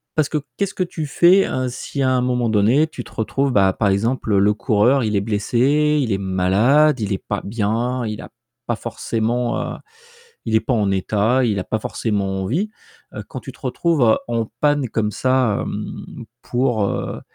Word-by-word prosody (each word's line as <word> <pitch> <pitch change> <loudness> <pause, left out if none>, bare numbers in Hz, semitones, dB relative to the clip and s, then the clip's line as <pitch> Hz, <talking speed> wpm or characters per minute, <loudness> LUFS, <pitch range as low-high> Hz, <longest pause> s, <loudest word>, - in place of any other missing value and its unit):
parce 155 -3 +1
que 155 - 0 0.2
qu'est-ce 200 -1 -1
que 185 - -1
tu 170 -3 -5
fais, 175 +6 +4
heu, 130 0 -2
si 140 +3 -5
à 130 -1 +2
un 125 -1 +2
moment 125 -2 0
donné, 110 +9 +3
tu 135 -5 -8
retrouves 135 +5 -1
bah 95 -3 +4
par 105 - 0
exemple, 110 +2 0
le 100 +2 +4
coureur 110 +5 +2
il 105 -2 -1
est 100 - +2
blessé, 130 +8 +1
il 120 -5 -1
est 95 - +1
malade, 100 +10 +3
il 105 -2 -1
est 95 - -4
pas 100 - -2
bien, 115 +4 -1
il 105 -1 -4
a - - -10 0.4
pas - - -1
forcément, 120 +2 -2 0.2
heu, - - -8 0.7
il 110 - +1
est - - +4
pas 130 - -2
en 105 -4 +1
état, 105 +6 +1
il 105 -4 0
a - - -5
pas 110 - -2
forcément 100 -3 -2
envie. 160 - -1 0.4
Heu, - - -5
quand - - -6
tu - - -9
te - - -21
retrouves 145 -10 +2
en 115 -2 -2
panne 145 -3 +2
comme 105 -1 -1
ça, 130 -4 +1
mmh, - - -7 0.2
pour, 120 -3 0
heu, - - -3
115 Hz, 195 wpm, -20 LUFS, 105-135 Hz, 0.7 s, fais